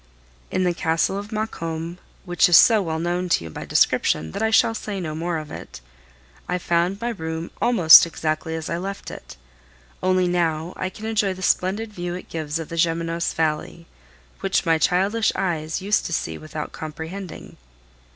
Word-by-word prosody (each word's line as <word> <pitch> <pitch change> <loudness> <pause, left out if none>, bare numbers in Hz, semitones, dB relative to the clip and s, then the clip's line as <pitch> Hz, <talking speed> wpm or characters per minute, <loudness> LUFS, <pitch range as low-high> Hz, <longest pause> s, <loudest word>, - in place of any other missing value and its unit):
In 185 - 0
the 180 -1 +2
Castle 165 +2 0
of 205 +2 -9
Maucombe, 170 -6 -4 0.3
which 175 0 +3
is 175 - +8
so 225 -3 +6
well 160 -4 -2
known 175 +2 -1
to 125 - +2
you 80 - -8
by - - -7
description 80 +1 +2
that - - -5
I 220 - +2
shall 220 0 +4
say 210 -3 -5
no 160 -4 -4
more 165 +2 -2
of 155 -1 -7
it, - - -9 0.7
I 180 - +1
found 175 +2 0
my 235 +2 -2
room 160 -6 -5
almost 180 -10 +8
exactly 160 0 -3
as 160 -1 -5
I 170 - -2
left 195 +2 -6
it; - - -11 0.6
only 185 -1 +2
now 170 -1 0
I 185 - -3
can 215 +3 -10
enjoy 210 -4 0
the 185 - -8
splendid 205 +5 0
view 175 -2 -4
it 180 - -9
gives 155 -1 -3
of 165 -2 -6
the 165 - -6
Gemenos 165 0 0
valley, 160 +1 -2 0.5
which - - 0
my 165 -1 +3
childish 195 +7 +2
eyes 165 -2 -2
used 205 +2 +1
to 170 - -5
see 80 - -2
without 155 - -6
comprehending. 160 +4 -8
175 Hz, 180 wpm, -23 LUFS, 160-190 Hz, 0.7 s, is